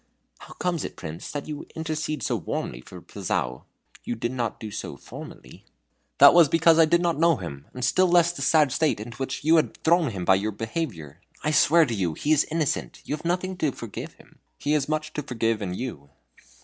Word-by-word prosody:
"How - - -12
comes 175 -3 -2
it, - - -6
Prince, 80 +1 -7
that 145 -1 -5
you 150 -1 -6
intercede 155 -2 -3
so 125 - 0
warmly 70 - -4
for - - -12
Pilzou? 60 0 -3 0.4
You 120 - -3
did 120 +1 -3
not 120 -3 -3
do 110 -2 -7
so - - -6
formerly." - - -11 0.5
"That 140 0 +9
was 170 -4 +6
because 165 +1 +5
I 165 - +8
did 170 +2 +3
not 170 -3 0
know 165 0 +5
him, 75 - -8
and 125 -1 -3
still 185 +8 +3
less 170 -1 +4
the 175 - -8
sad 150 0 +4
state 155 -4 +1
into 110 +1 -8
which 135 +2 -4
you 160 +2 +5
have 155 - +1
thrown 165 -2 +3
him 95 -5 -5
by 95 - +6
your 110 +1 -2
behavior. 100 - -5 0.2
I 155 - +1
swear 160 +2 +5
to 120 - -3
you 90 -7 -1
he 150 - -1
is 155 -1 +4
innocent 160 -2 -2
you 150 - -2
have 155 - -12
nothing 185 +2 -1
to 155 -6 0
forgive 115 -4 -8
in - - -18
him - - -25 0.2
he 145 - -2
has 150 -1 +1
much 155 0 -2
to 150 - -3
forgive 115 -5 -1
in 90 -3 -3
you." 95 - -6
145 Hz, 220 wpm, -25 LUFS, 110-160 Hz, 0.5 s, That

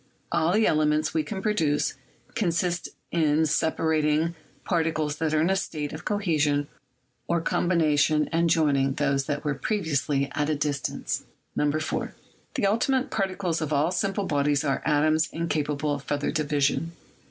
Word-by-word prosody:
All 160 +2 +2
the 215 +1 +4
elements 150 0 +2
we 160 - +2
can 190 +4 -5
produce 160 -9 +1 0.4
consist 175 -4 0 0.2
in 160 -1 +2
separating 160 +1 +1 0.3
particles 160 -4 0
that 160 0 0
are 155 0 +2
in 170 +4 +2
a - - +3
state 150 -6 -3
of 155 +2 -8
cohesion 150 -8 +1 0.6
or 170 0 +1
combination 155 -3 +2
and 165 +1 +2
joining 140 -4 +2
those 140 -1 0
that 145 -1 -3
were 145 - +1
previously 145 -5 0
at 150 0 0
a 155 - +1
distance. 145 -2 -2 0.3
4. 155 +2 -1 0.4
The - - +1
ultimate 255 +6 +1
particles 185 -5 -1
of 155 - -2
all 150 +3 +2
simple 195 +2 -1
bodies 145 -2 +1
are 140 -2 0
atoms 155 +1 +2
incapable 150 -3 -1
of 145 -1 -5
further 145 0 -1
division. 150 +1 0
155 Hz, 145 wpm, -26 LUFS, 145-170 Hz, 0.6 s, the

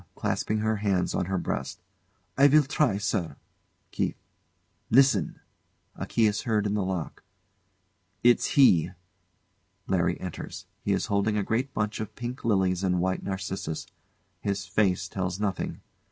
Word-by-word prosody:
[Clasping 110 - -1
her 110 0 +1
hands 100 -3 0
on - - 0
her 95 +1 -1
breast] 70 -6 -3 0.6
I 140 +1 +7
will 150 +2 +6
try, 140 -6 +1
sir. 100 -4 -1 0.6
KEITH. - - -1 0.7
Listen! 135 +3 +4 0.6
[A - - -5
key 115 - +2
is 105 0 +1
heard 110 -4 0
in 105 - 0
the 105 -2 0
lock.] 95 -3 -4 1.0
It's 120 +3 +3
he! 90 - +6 1.0
LARRY - - +1
enters. - - -7 0.2
He - - 0
is - - +1
holding 100 +1 +1
a 105 - +1
great 120 +7 -1
bunch 105 0 -1
of 110 -2 -5
pink 120 +3 -6
lilies 95 -4 +1
and 90 -1 +1
white 95 +1 0
narcissus. 95 -4 -4 0.5
His 100 -1 -2
face 95 -1 +1
tells 95 -1 -3
nothing. 105 -2 -2
100 Hz, 145 wpm, -27 LUFS, 95-110 Hz, 1.0 s, I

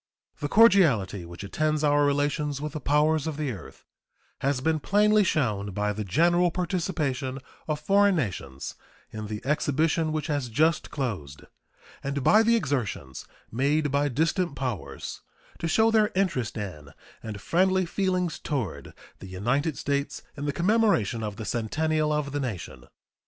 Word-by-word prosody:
The 145 -1 -3
cordiality 150 - +4
which 85 +3 -9
attends 155 +8 0
our 145 0 +4
relations 145 0 0
with 150 0 -5
the 155 - -4
powers 150 +1 +2
of 155 -2 -3
the 150 -4 -1
earth 95 -8 -11 0.5
has 140 -1 0
been 155 +4 +1
plainly 210 +5 +4
shown 105 - 0
by 105 +1 0
the 105 +1 -4
general 175 - +3
participation 160 -7 -2 0.3
of 155 -1 -1
foreign 200 +2 +4
nations 90 - -4 0.4
in 110 -1 -6
the 105 +1 -6
exhibition 155 +2 +1
which 155 -2 -2
has 145 -5 -2
just 155 +7 +1
closed 95 - -4 0.6
and 140 0 -2
by 215 +9 +6
the 230 +1 +4
exertions 120 - -3 0.2
made 145 +5 +1
by 140 +1 +2
distant 160 +4 0
powers 125 -8 -5 0.4
to 165 - -2
show 220 +7 +3
their 215 -2 +4
interest 170 - 0
in 90 -9 -6 0.3
and 110 -2 -6
friendly 185 - +2
feelings 180 -2 -1
toward 100 - -4 0.2
the 95 - -9
United 125 - -1
States 140 0 -2
in 145 - -5
the - - +1
commemoration 180 - +2
of 105 -2 -4
the 110 - -6
centennial 150 +8 0
of 150 -2 -1
the 145 - -2
nation. 115 -10 -5
145 Hz, 150 wpm, -26 LUFS, 115-165 Hz, 0.6 s, by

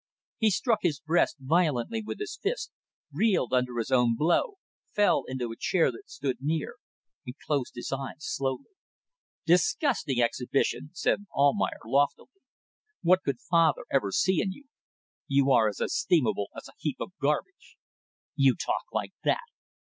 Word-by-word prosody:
He 220 - +4
struck 225 +3 +1
his 155 -6 0
breast 165 +2 +1
violently 155 - +1
with - - -5
his 415 0 -5
fist, 440 +2 -2 0.4
reeled 185 - +1
under 125 -1 +1
his 115 +2 -2
own 125 -3 +4
blow, 175 - +2 0.4
fell 205 -1 +3
into 125 -3 -3
a - - -6
chair 165 +3 +2
that 115 - -13
stood 135 -3 -3
near 155 +2 -2 0.5
and 125 - -8
closed 140 -4 -1
his 120 - -5
eyes 135 -1 -6
slowly. 135 - -3 0.7
"Disgusting 175 - +2
exhibition," 125 +4 0
said 205 +3 0
Almayer, 140 0 +2
loftily. 140 - +1 0.7
"What 185 +2 +5
could 140 -8 -3
father 165 -1 +2
ever 120 -8 +1
see 190 - +2
in 195 - -1
you? 285 - -16 0.6
You 140 0 +3
are 110 -4 +5
as 105 - -4
estimable 125 - +1
as - - -8
a - - -16
heap - - -2
of - - -5
garbage." - - -2 0.6
"You 135 -3 +4
talk - - -2
like - - -3
that! - - +3
140 Hz, 150 wpm, -28 LUFS, 125-180 Hz, 0.7 s, What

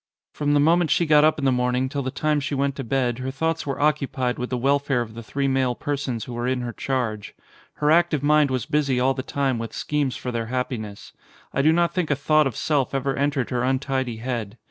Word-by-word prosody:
From 145 0 0
the - - +4
moment 165 +2 +3
she 170 - +3
got 150 -1 +5
up 155 0 +4
in 140 - -2
the 135 - +4
morning 125 +1 +1
till 140 +1 -3
the 130 - -3
time 150 +2 0
she 145 0 -3
went 140 0 0
to 135 - -3
bed 125 -1 0
her 130 +1 -3
thoughts 160 +3 -2
were 140 - -3
occupied 140 -4 0
with 125 - -3
the 125 - -1
welfare 140 0 +1
of 110 -2 -6
the 115 - -8
three 140 +4 -2
male 130 -2 +1
persons 135 -6 -3
who 125 - -7
were 120 +1 -2
in 130 -1 0
her 120 -1 -4
charge. 115 -7 -3 0.4
Her 150 0 +1
active 165 -3 +3
mind 150 -1 +4
was 130 -3 -1
busy 140 -4 +1
all 130 +2 +3
the 130 - -4
time 135 -2 -1
with 115 -1 -5
schemes 145 -4 -1
for 125 - -4
their 115 -1 -3
happiness. 115 -4 -4 0.4
I - - +1
do 155 +3 +5
not 170 +1 +2
think 180 -4 -1
a 145 - +2
thought 155 +1 +3
of 125 - -5
self 140 -3 0
ever 135 0 -1
entered 140 -2 -1
her 125 -1 0
untidy 130 -2 -1
head. 115 -2 -4
135 Hz, 240 wpm, -23 LUFS, 125-145 Hz, 0.4 s, got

